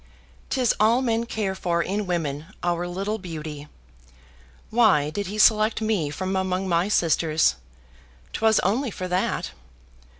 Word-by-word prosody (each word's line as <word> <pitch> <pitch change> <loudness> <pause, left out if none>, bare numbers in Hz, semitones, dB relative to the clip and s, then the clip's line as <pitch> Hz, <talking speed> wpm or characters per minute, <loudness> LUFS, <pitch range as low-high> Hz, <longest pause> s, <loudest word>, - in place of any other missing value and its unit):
'Tis 255 -3 +2
all 225 +3 +4
men 230 -1 0
care 210 -4 -2
for 170 -2 -1
in 200 +1 -2
women, 155 -4 -2 0.2
our 175 0 0
little 195 +5 -3
beauty. 155 -5 -7 1.0
Why 185 -11 +3
did 200 +3 -3
he 205 +3 -5
select 215 0 +4
me 215 -9 0
from 185 +5 -3
among 190 0 -1
my 170 +1 +1
sisters? 165 - +2 0.8
'Twas 220 0 +3
only 235 +8 0
for 185 -2 -5
that. 180 +1 -1
190 Hz, 135 wpm, -24 LUFS, 170-215 Hz, 1.0 s, all